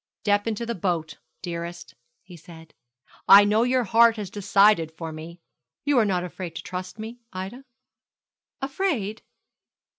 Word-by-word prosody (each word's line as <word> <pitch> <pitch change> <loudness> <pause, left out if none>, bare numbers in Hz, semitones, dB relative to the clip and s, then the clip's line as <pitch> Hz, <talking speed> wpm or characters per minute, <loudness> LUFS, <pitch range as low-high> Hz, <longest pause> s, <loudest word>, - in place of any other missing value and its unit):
'Step 205 +1 +1
into 225 +1 -2
the 235 - -2
boat, 165 -6 -3 0.2
dearest,' 170 0 -6 0.3
he 180 -1 -13
said; 160 -1 -14 0.6
'I 200 +1 +10
know 210 +2 +3
your 250 +1 +2
heart 230 +2 +5
has 205 -4 -6
decided 200 -4 +3
for 160 0 -7
me. 160 +2 -9 0.5
You 285 -3 +3
are 220 - +3
not 185 -3 0
afraid 180 -1 -7
to - - -6
trust 180 +2 -6
me, 225 +3 -8
Ida?' 190 +8 -7 1.0
'Afraid? 270 - -2
195 Hz, 145 wpm, -25 LUFS, 175-225 Hz, 1.0 s, I